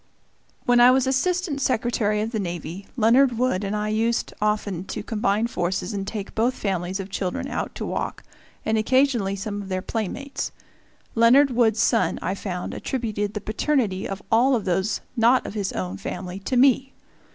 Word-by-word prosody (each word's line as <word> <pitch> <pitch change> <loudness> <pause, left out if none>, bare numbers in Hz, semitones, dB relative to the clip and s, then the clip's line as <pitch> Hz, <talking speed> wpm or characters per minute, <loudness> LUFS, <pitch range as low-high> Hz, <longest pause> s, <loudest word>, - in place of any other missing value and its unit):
When 245 0 +4
I 245 +1 +8
was 260 0 +4
Assistant 295 +3 0
Secretary 225 -4 +1
of 225 - -3
the 220 - -2
Navy, 175 0 -5
Leonard 240 +2 +4
Wood 245 -5 +1
and 200 +1 -2
I 210 0 -1
used 225 +2 0
often 210 -4 0
to - - -5
combine 210 0 0
forces 185 -2 -2
and 195 -1 -3
take 205 -2 -5
both 235 +3 +1
families 190 -1 -2
of 195 0 -6
children 185 -2 -2
out - - -4
to - - -4
walk, - - -3 0.4
and 220 0 +2
occasionally 240 -4 +2
some 205 +1 -4
of 195 - -9
their 185 0 -2
playmates. 235 +7 -3 0.6
Leonard 255 +5 +5
Wood's 230 -3 +3
son, 230 - +2
I 185 - -2
found, 185 -2 -4
attributed 215 -5 -3
the 210 - -3
paternity 215 -4 0
of 195 0 -5
all 250 +4 +5
of 220 - -2
those 190 +3 0
not 240 +2 +4
of - - -5
his 200 -3 -2
own 95 0 -3
family 180 - -5
to 245 +6 -1
me. 265 +1 +4
215 Hz, 175 wpm, -24 LUFS, 195-245 Hz, 0.6 s, I